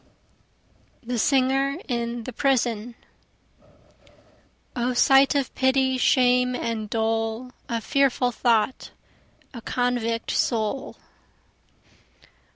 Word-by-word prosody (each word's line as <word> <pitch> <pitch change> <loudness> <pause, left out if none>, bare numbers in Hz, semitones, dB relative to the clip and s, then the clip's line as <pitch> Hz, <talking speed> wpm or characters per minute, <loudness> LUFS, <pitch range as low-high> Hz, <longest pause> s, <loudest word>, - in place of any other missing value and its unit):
The 240 0 -3
Singer 270 +2 +1
in 235 -2 -3
the 255 - -7
Prison 240 -3 0 1.8
O 245 0 -1
sight 270 +3 +5
of 275 -3 -1
pity, 260 0 +1
shame 250 0 +3
and 225 -3 -4
dole! 225 +2 -2 0.2
O 230 -1 -1
fearful 265 0 +1
thought 235 +1 0 0.6
a 235 - -8
convict 235 -2 -2
soul. 230 +2 -1
245 Hz, 85 wpm, -24 LUFS, 230-260 Hz, 1.8 s, sight